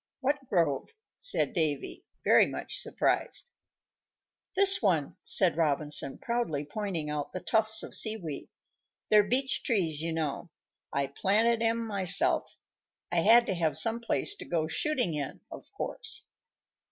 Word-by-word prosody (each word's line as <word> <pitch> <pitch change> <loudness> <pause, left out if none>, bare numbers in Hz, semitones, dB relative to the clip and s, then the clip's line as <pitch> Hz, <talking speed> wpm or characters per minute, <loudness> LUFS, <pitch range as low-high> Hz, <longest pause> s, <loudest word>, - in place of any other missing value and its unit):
"What 275 0 -2
grove?" 165 - 0 0.3
said - - -1
Davy, 155 -5 -1 0.2
very - - +5
much - - -4
surprised. 485 - -1 1.0
"This 390 +1 +7
one," 170 - 0
said 185 -5 +4
Robinson, 150 -3 0
proudly 235 -12 -2
pointing 175 -2 -4
out 150 -1 -4
the 185 - -4
tufts 220 +2 +2
of - - -9
sea 220 0 +2
weed. 160 -8 -7 0.6
"They're 210 0 +7
beach 255 +6 -1
trees, 170 - -1
you 165 +1 -3
know; 160 0 -3 0.4
I 140 0 0
planted 220 +11 +1
'em 230 0 0
myself. 195 -4 +1 0.5
I 175 - -1
had 230 +7 +5
to 195 - -1
have 165 -3 -1
some 230 0 0
place 235 +11 -1
to - - -9
go 165 -3 -1
shooting 260 - -1
in, 145 -3 -5
of - - -11
course." - - -3
190 Hz, 140 wpm, -29 LUFS, 155-230 Hz, 1.0 s, This